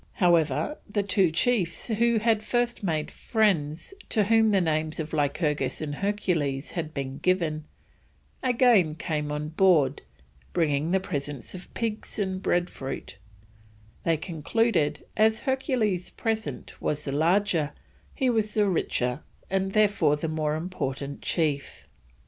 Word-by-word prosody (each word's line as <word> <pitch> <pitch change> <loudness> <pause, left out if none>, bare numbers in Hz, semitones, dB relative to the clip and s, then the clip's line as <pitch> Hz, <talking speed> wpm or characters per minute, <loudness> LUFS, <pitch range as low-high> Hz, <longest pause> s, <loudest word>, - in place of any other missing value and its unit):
However, 170 - +2
the 205 0 0
two 195 -2 +3
chiefs 180 +1 +1
who 235 +1 +2
had 220 -1 +2
first 240 +1 0
made 160 -6 -1
friends, 185 - 0 0.2
to 215 - +3
whom 220 +1 +4
the 200 -2 +4
names 155 -2 0
of 160 0 -4
Lycurgus 150 0 0
and 150 -2 -3
Hercules 165 -8 -1
had 165 -3 -4
been 135 -2 -5
given, 165 -4 0 0.8
again 235 -10 +4
came 150 -2 -2
on 150 +1 -3
board, 160 -5 +3 0.5
bringing 155 0 +1
presents 145 -7 -5
of 185 -1 -9
pigs 220 -2 -3
and 190 -2 -1
bread 175 -1 +1
fruit; 135 - -7 0.9
they 165 -1 +2
concluded 165 -1 0
as 220 0 +3
Hercules's 255 - 0
present 220 -1 -4
was 150 0 -1
the 140 - -2
larger, 165 +1 +2 0.4
he 265 - +1
was 220 -3 +1
the 210 -2 +3
richer 125 -7 0 0.3
and 195 0 0
therefore 200 -8 +3
the 150 +2 -3
more 155 -1 -1
important 140 -5 -4
chief. 150 -5 -1
175 Hz, 130 wpm, -27 LUFS, 150-210 Hz, 0.9 s, whom